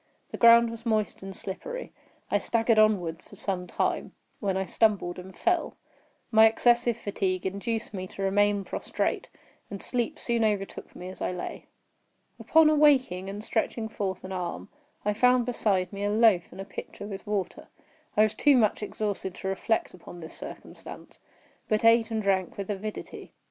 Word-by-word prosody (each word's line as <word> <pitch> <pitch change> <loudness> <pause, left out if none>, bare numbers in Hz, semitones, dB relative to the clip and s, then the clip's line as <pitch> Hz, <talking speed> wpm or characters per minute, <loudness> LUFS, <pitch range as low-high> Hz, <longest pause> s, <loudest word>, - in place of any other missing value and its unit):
The - - -5
ground 235 0 +7
was 230 0 -9
moist 220 -3 0
and 195 0 -8
slippery. - - -6 0.4
I - - +3
staggered 225 -1 +2
onward 185 -6 +2
for - - -16
some 180 -2 -3
time, - - -1 0.3
when 195 -3 -1
I 190 - -1
stumbled 190 -3 +1
and 185 0 -11
fell. 350 -1 0 0.6
My 220 0 +8
excessive 240 +1 +3
fatigue 190 -4 -2
induced 220 +4 -3
me 185 -1 -5
to 195 - -7
remain 205 +1 +2
prostrate; - - -2 0.4
and 200 - -6
sleep 240 +1 -2
soon 235 -1 0
overtook 205 -3 -2
me 180 +1 -7
as 185 - -11
I - - -1
lay. 180 - -6 0.7
Upon 320 -1 +5
awaking, 270 -11 +3
and 205 +2 -6
stretching 225 0 -1
forth 190 -4 -4
an 185 - -7
arm, 180 -2 -4 0.4
I 210 - +2
found 250 +2 +4
beside 205 -6 0
me 200 0 -4
a 205 - +1
loaf 215 -5 +4
and - - -13
a 195 - -5
pitcher 205 - -8
with 200 0 -8
water. 205 -3 -3 0.5
I 215 - +7
was 215 - +1
too 290 -3 +4
much 215 -3 +2
exhausted 205 -3 -3
to 190 - -4
reflect 205 +4 -1
upon 175 -1 -11
this 160 -1 -9
circumstance, - - -10 0.5
but 215 +1 +1
ate 230 0 +5
and 220 -1 -2
drank 190 -2 0
with 200 0 -3
avidity. 205 +2 -7
205 Hz, 170 wpm, -27 LUFS, 190-230 Hz, 0.7 s, My